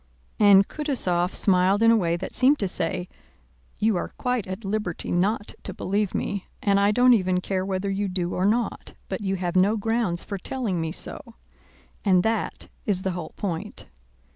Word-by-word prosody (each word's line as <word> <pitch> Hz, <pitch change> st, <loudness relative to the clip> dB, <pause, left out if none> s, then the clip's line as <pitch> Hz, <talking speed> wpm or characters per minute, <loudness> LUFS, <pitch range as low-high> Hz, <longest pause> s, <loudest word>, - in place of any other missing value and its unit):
And 200 Hz, -2 st, +7 dB
Kutúzov 190 Hz, -, -1 dB
smiled 190 Hz, +2 st, +3 dB
in 230 Hz, -, +7 dB
a -, -, +6 dB
way 170 Hz, -6 st, +1 dB
that -, -, -6 dB
seemed 270 Hz, +3 st, +4 dB
to 200 Hz, -, 0 dB
say, 175 Hz, 0 st, -2 dB, 0.7 s
"You 215 Hz, -2 st, +2 dB
are -, -, -3 dB
quite 250 Hz, -5 st, -1 dB
at 190 Hz, +3 st, -6 dB
liberty 195 Hz, -4 st, -3 dB
not 205 Hz, +4 st, 0 dB
to 190 Hz, -, -7 dB
believe 200 Hz, 0 st, -1 dB
me 200 Hz, -2 st, -3 dB
and 200 Hz, -1 st, +2 dB
I 200 Hz, 0 st, +4 dB
don't 245 Hz, +4 st, +5 dB
even 185 Hz, -4 st, +2 dB
care 185 Hz, 0 st, -2 dB
whether 190 Hz, 0 st, -2 dB
you 200 Hz, +1 st, -1 dB
do 180 Hz, -2 st, -2 dB
or 185 Hz, -, 0 dB
not, 230 Hz, +3 st, -1 dB
but -, -, -3 dB
you 195 Hz, -1 st, -1 dB
have 180 Hz, -1 st, -3 dB
no 200 Hz, +4 st, +4 dB
grounds 220 Hz, -5 st, -1 dB
for 200 Hz, -, -5 dB
telling 210 Hz, -5 st, -2 dB
me 160 Hz, 0 st, -2 dB
so. -, -, -5 dB, 0.7 s
And 185 Hz, -3 st, +4 dB
that 225 Hz, -1 st, -2 dB, 0.2 s
is 190 Hz, -3 st, -1 dB
the 190 Hz, -, 0 dB
whole 175 Hz, -3 st, -6 dB
point." 170 Hz, -5 st, -4 dB
195 Hz, 185 wpm, -25 LUFS, 180-215 Hz, 0.7 s, And